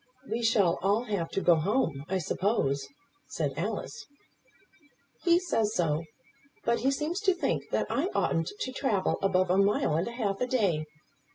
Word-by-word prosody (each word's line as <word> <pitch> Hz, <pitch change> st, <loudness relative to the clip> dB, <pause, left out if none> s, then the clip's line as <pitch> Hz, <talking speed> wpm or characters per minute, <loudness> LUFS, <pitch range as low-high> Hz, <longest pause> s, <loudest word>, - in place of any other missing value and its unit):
"We 230 Hz, +2 st, -2 dB
shall 205 Hz, -7 st, +3 dB
all 200 Hz, +5 st, +2 dB
have 200 Hz, -8 st, -2 dB
to 195 Hz, -, -2 dB
go 175 Hz, -, +5 dB
home, 160 Hz, -, 0 dB
I 190 Hz, -, +1 dB
suppose?" 150 Hz, -7 st, 0 dB, 0.4 s
said 145 Hz, -4 st, -2 dB
Alice. 205 Hz, +7 st, -4 dB, 1.1 s
"He 345 Hz, -1 st, +4 dB
says 225 Hz, -, 0 dB
so; 165 Hz, -2 st, 0 dB, 0.6 s
but 235 Hz, 0 st, +1 dB
he 260 Hz, -, +2 dB
seems 300 Hz, +6 st, -1 dB
to 390 Hz, -3 st, +2 dB
think 360 Hz, -, -1 dB
that -, -, 0 dB
I 305 Hz, +6 st, 0 dB
oughtn't 165 Hz, +1 st, +1 dB
to 260 Hz, -, -2 dB
travel 220 Hz, -7 st, 0 dB
above 185 Hz, -2 st, +2 dB
a 190 Hz, -, +3 dB
mile 200 Hz, -5 st, +2 dB
and 165 Hz, +4 st, 0 dB
a -, -, -4 dB
half 205 Hz, -4 st, -2 dB
a 250 Hz, -, +1 dB
day. 195 Hz, -12 st, +1 dB
200 Hz, 170 wpm, -29 LUFS, 170-240 Hz, 1.1 s, go